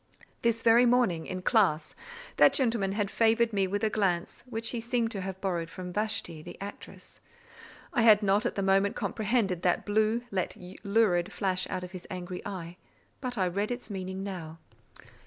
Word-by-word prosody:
This 230 Hz, -1 st, +1 dB
very 235 Hz, +2 st, +6 dB
morning, 235 Hz, -10 st, +2 dB
in 185 Hz, 0 st, -5 dB
class, 190 Hz, -10 st, +2 dB, 0.4 s
that -, -, +7 dB
gentleman 230 Hz, -7 st, +1 dB
had 205 Hz, -1 st, -1 dB
favoured 230 Hz, 0 st, +3 dB
me 195 Hz, -2 st, +2 dB
with 205 Hz, +3 st, -2 dB
a 220 Hz, -, +3 dB
glance 180 Hz, -5 st, -1 dB
which 225 Hz, -1 st, -2 dB
he 235 Hz, -, -3 dB
seemed 235 Hz, -1 st, 0 dB
to 195 Hz, -, -4 dB
have 190 Hz, 0 st, -5 dB
borrowed 175 Hz, -4 st, -2 dB
from 180 Hz, +1 st, -7 dB
Vashti, 205 Hz, -6 st, -2 dB
the -, -, -10 dB
actress; 200 Hz, +1 st, -10 dB, 0.7 s
I -, -, +2 dB
had 215 Hz, -2 st, +6 dB
not 200 Hz, +2 st, +3 dB
at -, -, -4 dB
the 200 Hz, -, -1 dB
moment 195 Hz, +1 st, +3 dB
comprehended 210 Hz, -5 st, 0 dB
that 180 Hz, -1 st, +1 dB
blue, 220 Hz, +3 st, +1 dB
yet 185 Hz, -3 st, -2 dB, 0.3 s
lurid, 200 Hz, -4 st, +2 dB
flash 185 Hz, -2 st, -1 dB
out 185 Hz, -1 st, -3 dB
of 180 Hz, -, -8 dB
his 185 Hz, -2 st, -9 dB
angry 180 Hz, 0 st, -5 dB
eye; 180 Hz, -3 st, -7 dB, 0.4 s
but 250 Hz, -3 st, -4 dB
I 190 Hz, -, +2 dB
read 200 Hz, +4 st, -1 dB
its 245 Hz, -2 st, -5 dB
meaning 190 Hz, 0 st, -4 dB
now. 170 Hz, -5 st, -6 dB
200 Hz, 180 wpm, -29 LUFS, 185-225 Hz, 0.7 s, that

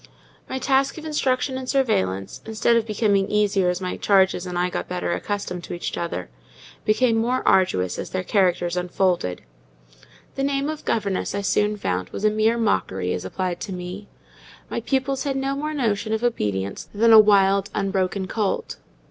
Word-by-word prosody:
My 260 Hz, -, -2 dB
task 270 Hz, +2 st, +1 dB
of 315 Hz, -, -8 dB
instruction 260 Hz, -3 st, 0 dB
and 255 Hz, -1 st, -7 dB
surveillance, 95 Hz, -, 0 dB
instead 225 Hz, +1 st, +1 dB
of 230 Hz, -1 st, +1 dB
becoming 205 Hz, -2 st, +1 dB
easier 200 Hz, -3 st, +2 dB
as 180 Hz, 0 st, -1 dB
my 185 Hz, -1 st, -4 dB
charges 190 Hz, -2 st, +3 dB
and 180 Hz, -1 st, -4 dB
I 180 Hz, +1 st, 0 dB
got -, -, -3 dB
better 180 Hz, -1 st, -2 dB
accustomed 200 Hz, -4 st, -4 dB
to -, -, -5 dB
each 175 Hz, -, -4 dB
other, 170 Hz, -, -4 dB, 0.6 s
became 225 Hz, +2 st, +3 dB
more 245 Hz, +3 st, 0 dB
arduous 95 Hz, -, +2 dB
as -, -, -5 dB
their 185 Hz, 0 st, -2 dB
characters 180 Hz, -3 st, +1 dB
unfolded. 180 Hz, -, 0 dB, 0.9 s
The 270 Hz, -, -3 dB
name 280 Hz, +1 st, 0 dB
of 310 Hz, -1 st, -6 dB
governess, 200 Hz, -3 st, -1 dB
I 200 Hz, -, -1 dB
soon 210 Hz, +1 st, +1 dB
found, 90 Hz, -, -2 dB
was 215 Hz, -, -4 dB
a 215 Hz, -, +5 dB
mere 215 Hz, +2 st, +2 dB
mockery 95 Hz, -, 0 dB
as 90 Hz, -, -4 dB
applied 180 Hz, -, -3 dB
to 200 Hz, -, -5 dB
me: 180 Hz, +3 st, -7 dB, 0.6 s
my -, -, -1 dB
pupils 270 Hz, +2 st, -1 dB
had 275 Hz, -2 st, -1 dB
no 270 Hz, +1 st, -1 dB
more 300 Hz, +2 st, -3 dB
notion 220 Hz, -6 st, -1 dB
of 220 Hz, +2 st, -1 dB
obedience 100 Hz, -, -2 dB
than 225 Hz, +2 st, +5 dB
a 220 Hz, -, +11 dB
wild, 200 Hz, -1 st, +4 dB
unbroken 195 Hz, -1 st, -1 dB
colt. 215 Hz, -, -2 dB
205 Hz, 175 wpm, -23 LUFS, 180-235 Hz, 0.9 s, a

